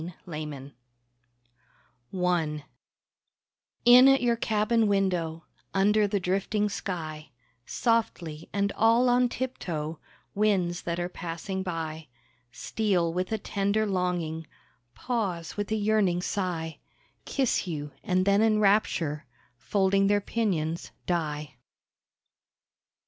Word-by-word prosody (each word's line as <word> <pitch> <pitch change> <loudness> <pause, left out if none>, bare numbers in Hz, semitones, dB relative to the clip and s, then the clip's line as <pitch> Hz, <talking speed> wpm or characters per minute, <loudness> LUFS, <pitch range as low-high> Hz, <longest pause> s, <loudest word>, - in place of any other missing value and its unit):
A - - -5
SEA 175 - -9 1.9
CYCLE 180 -1 -2
I 155 -4 0 1.2
In 250 +2 +9
at 270 -1 +5
your 240 -1 +3
cabin 220 0 +1
window, 175 -5 0 0.3
Under 205 +2 +4
the 200 0 0
drifting 195 +3 0
sky, 155 -7 -5 0.4
Softly, 175 -9 -1
and 200 0 0
all 230 +3 +4
on 245 0 +3
tiptoe 165 -12 -4 0.3
Winds 190 -4 +1
that 170 0 -3
are 175 - -1
passing 180 +2 -5
by 160 -3 -4 0.4
Steal 185 -7 0
with 185 +3 -2
a 220 - +1
tender 200 +1 0
longing, 175 -5 -2 0.5
Pause, 195 -10 -3
with 205 0 -3
a - - +2
yearning 205 -4 +2
sigh, 165 -6 -3 0.5
Kiss 260 -7 0
you—and 165 +4 -2
then 200 +1 +4
in 220 -1 +4
rapture 180 -8 +1 0.3
Folding 195 +10 +2
their 205 0 +3
pinions 175 -7 -2 0.2
die. 150 -6 -2
190 Hz, 110 wpm, -27 LUFS, 165-210 Hz, 1.9 s, In